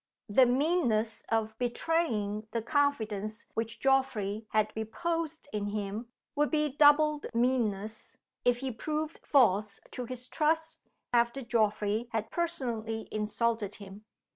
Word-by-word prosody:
The 250 +5 +6
meanness 245 -5 +1
of 220 -1 0
betraying 235 -5 0
the 230 - 0
confidence 225 -7 0
which 225 0 -3
Geoffrey 230 -6 +1
had 215 0 +1
reposed 320 +8 -3
in 205 -1 -1
him 205 +2 -3 0.3
would 295 0 +2
be 300 -1 +1
doubled 295 0 +5
meanness 220 -4 0 0.3
if 245 -1 +3
he 265 -1 -2
proved 305 +6 -3
false 210 -6 +3
to 250 - -4
his 250 +1 -7
trust 320 +2 0 0.3
after 240 +3 +2
Geoffrey 215 -1 +1
had 220 -1 -2
personally 235 -10 -2
insulted 215 0 -1
him. 200 +1 -11
235 Hz, 120 wpm, -30 LUFS, 215-285 Hz, 0.3 s, The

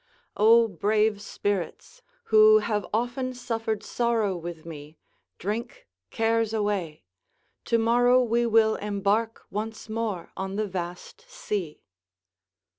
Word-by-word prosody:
["O 230 +2 +6
brave 210 +2 +1
spirits, 205 - -4 0.3
who 215 0 +8
have 210 -2 -1
often 245 +3 -2
suffered 225 -3 -3
sorrow 230 -5 0
with 170 -2 -7
me, 155 -1 -10 0.4
drink 225 +6 -5 0.2
cares 225 0 0
away; 200 - -2 0.6
tomorrow 240 +2 +4
we 235 0 +1
will 220 -1 +3
embark 210 +2 -1
once 215 +2 -5
more 215 -5 -3
on 190 +1 -4
the 215 +1 0
vast 180 - -6
sea." 210 - -5
215 Hz, 110 wpm, -26 LUFS, 200-230 Hz, 0.6 s, who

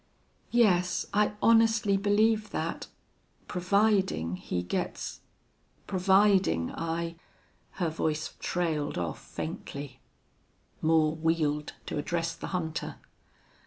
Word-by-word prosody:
"Yes, 180 -7 +3
I 210 0 +3
honestly 225 -2 +4
believe 210 +2 +2
that - - -3 0.6
providing 190 - +1
he 90 -1 -3
gets 90 - -3 0.7
providing 190 - +3
I 165 0 -3 0.3
" - - -38
Her 175 -4 -1
voice 155 -1 -2
trailed 160 -4 -1
off 85 -2 -3
faintly. 140 -2 -6 0.8
Moore 155 -1 +3
wheeled 155 -2 0
to - - -3
address 165 +2 -1
the - - -7
hunter. 165 -4 -3
170 Hz, 95 wpm, -29 LUFS, 155-200 Hz, 0.8 s, honestly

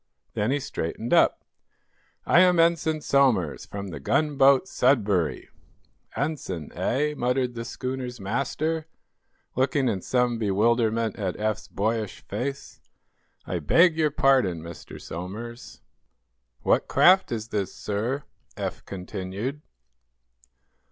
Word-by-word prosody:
Then 105 +2 0
he 140 +2 +1
straightened 115 -1 -4
up. - - +4 0.8
"I - - +5
am 180 -2 +5
Ensign 165 -2 +2
Somers, 125 - +2
from 100 -1 -6
the 80 -4 -7
gunboat 140 - +3
'Sudbury.'" 105 - +1 0.7
"Ensign, 95 - -3
eh?" 150 +4 0
muttered 125 -1 0
the 115 -1 -5
schooner's 125 0 -5
master, 150 +9 -2 0.7
looking 130 +1 +1
in 100 -6 -1
some 125 0 +1
bewilderment 110 +2 +1
at 95 -4 -2
Eph's 110 0 -2
boyish 110 0 -2
face. 135 +7 -5 0.6
"I 90 - -2
beg 165 - +4
your 155 -1 +2
pardon, 130 - +2
Mr. 85 0 -10
Somers." 110 +8 -8 0.8
"What - - +2
craft 185 +2 +5
is 110 -1 -4
this, 100 -4 -2
sir?" 115 +7 -3 0.3
Eph - - -4
continued. 95 +8 -5
120 Hz, 110 wpm, -26 LUFS, 100-140 Hz, 0.8 s, I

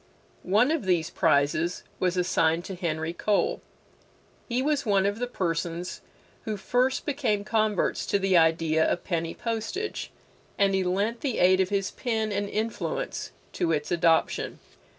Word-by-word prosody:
One 215 +9 +3
of 315 -10 -1
these 175 -4 +1
prizes 155 +3 +1 0.2
was 185 0 +1
assigned 170 -2 +2
to 195 - -5
Henry 165 -2 -2
Cole. 215 - 0 0.9
He 240 +1 0
was 285 +1 +1
one 200 -5 +2
of 205 +2 -1
the 245 - -1
persons 170 -4 -3 0.4
who 215 -1 -2
first 250 +6 0
became 255 -8 0
converts 215 -2 0
to - - +2
the 195 -1 +1
idea 160 -1 +3
of 175 - 0
penny 165 -2 -2
postage, 230 - -3 0.5
and 200 -1 +3
he 190 -1 +2
lent 200 +6 -1
the 265 -5 -1
aid 185 +1 +5
of 185 -1 +2
his 195 -2 -1
pen 220 -3 -2
and 200 0 -1
influence 230 - -3 0.2
to 170 -3 0
its 150 -2 -1
adoption. 170 -1 +2
195 Hz, 150 wpm, -27 LUFS, 170-225 Hz, 0.9 s, aid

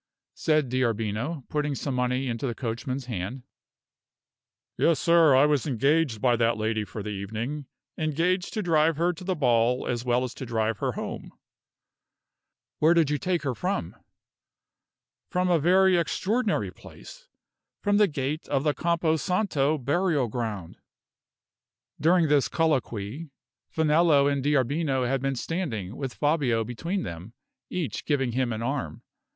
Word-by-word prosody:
said 155 -3 +1
D'Arbino, 120 +3 -1
putting 150 -1 -1
some 140 0 -3
money 125 +1 0
into 120 +2 -2
the 120 - -3
coachman's 125 +2 -4
hand. 120 +2 -5 1.3
"Yes, 165 -2 +2
sir; 165 -4 +5
I 135 +2 +6
was 150 -2 +1
engaged 140 -1 +1
by 120 +1 +3
that 115 0 +2
lady 110 0 -1
for 105 0 -7
the 105 - -4
evening 110 +8 -4 0.3
engaged 170 +4 0
to 215 - -1
drive 160 -2 +3
her 175 +2 +1
to 170 - -11
the 185 0 -1
ball 125 -3 +2
as 120 -1 -2
well 125 0 +1
as 125 -1 -4
to 130 - -7
drive 110 -2 -1
her - - -1
home." - - -6 1.5
"Where 160 +3 +5
did 160 -4 +3
you 150 - 0
take 180 -3 -1
her 135 -3 -1
from?" 185 - -3 1.3
"From 180 -1 +1
a 170 - +4
very 185 +3 +4
extraordinary 210 +8 0
place - - -14 0.6
from 205 0 +3
the 210 -1 +5
gate 145 0 -3
of 140 -1 0
the 150 -1 +2
Campo 165 -1 +1
Santo 155 -4 +1
burial 145 -1 +1
ground." 105 -7 -4 1.2
During 170 +1 +4
this 145 -2 +3
colloquy, 140 -3 -1 0.4
Finello 155 -2 +3
and 140 -2 0
D'Arbino 140 -1 +1
had 135 +1 0
been 135 0 -1
standing 120 - -3
with 135 -3 -5
Fabio 145 -7 +1
between 165 - -3
them, 85 +6 -8 0.4
each 180 -3 -3
giving 135 -5 0
him 125 0 0
an 110 0 -3
arm. 120 - -3
140 Hz, 145 wpm, -26 LUFS, 120-165 Hz, 1.5 s, I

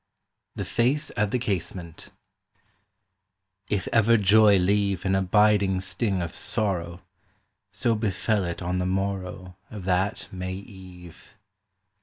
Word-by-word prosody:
THE - - -4
FACE 130 +6 0
AT 105 0 +1
THE 125 - 0
CASEMENT 90 -6 -4 1.6
IF 100 -4 -1
ever 115 0 +5
joy 105 0 +5
leave 100 0 +1
An 95 - +1
abiding 100 0 +3
sting 95 0 -1
of 85 - -6
sorrow, 90 -5 -2 0.7
So 115 - +1
befell 105 -1 0
it 85 +1 -4
on 90 +1 -1
the 90 - -1
morrow 95 -1 -3
Of 105 -4 -8
that 95 +2 0
May 95 0 -5
eve 95 -1 -13
95 Hz, 120 wpm, -25 LUFS, 90-105 Hz, 1.6 s, ever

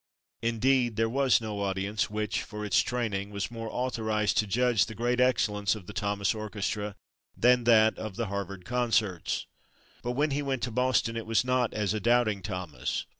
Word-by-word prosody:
Indeed, 120 +1 +2
there 115 +1 +2
was 135 +1 +3
no 105 -2 -4
audience 100 +2 -1
which, 105 -1 -2
for 105 -1 -6
its 95 -3 +3
training, 105 -5 -2
was 100 +2 -4
more 115 -1 -5
authorized 110 -4 0
to 110 - +1
judge 120 +1 +2
the 110 - -8
great 120 +2 0
excellence 105 -5 +2
of 105 -4 -10
the 100 - -9
Thomas 100 0 0
orchestra 105 -1 -3 0.4
than 125 0 +4
that 110 -2 +5
of 110 -3 -5
the 115 - -1
Harvard 100 -2 -5
concerts. 115 -7 0 0.6
But 120 - -2
when 145 +4 +1
he 140 +2 0
went 135 -3 -2
to 120 - -1
Boston 125 -1 +1
it 115 -1 -4
was 115 +2 +2
not 125 -2 +1
as 105 -2 0
a 110 - -1
doubting 115 -2 +2
Thomas. 90 -6 -4
110 Hz, 180 wpm, -28 LUFS, 105-120 Hz, 0.6 s, that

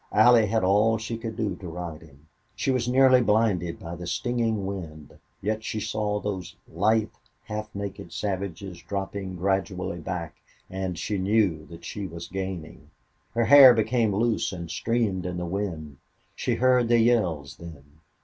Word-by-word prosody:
Allie 115 0 +6
had 110 0 +1
all 105 +4 +3
she 115 +1 -4
could 115 -1 -6
do 105 -4 -2
to 90 - -9
ride 85 -2 -6
him. 75 -1 -18 0.3
She 135 - 0
was 125 -2 0
nearly 130 0 +6
blinded 105 -7 +1
by 85 +1 -7
the 90 +1 -7
stinging 115 -1 -1
wind, 80 -6 -7 0.2
yet 110 +2 -1
she 110 - -3
saw 105 0 -1
those 95 -4 -5
lithe, 110 +5 +1 0.3
half 105 -1 -5
naked 100 -4 -6
savages 95 -1 -4
dropping 95 -1 -4
gradually 95 -1 -1
back 85 -1 -5 0.3
and 95 -2 -3
she 100 +4 -2
knew 95 -6 +1
that 85 0 -12
she 100 +2 -5
was 85 0 -8
gaining. 95 -3 -6 0.5
Her 115 0 +2
hair 135 -3 +9
became 110 -2 +1
loose 115 +2 +1
and 85 -3 -6
streamed 100 -3 -1
in 90 -1 -4
the 90 - -3
wind. 85 -6 -4 0.4
She - - -1
heard 125 -1 +3
the 120 0 +4
yells 95 - +1
then. 80 -3 -13
100 Hz, 160 wpm, -26 LUFS, 85-110 Hz, 0.5 s, hair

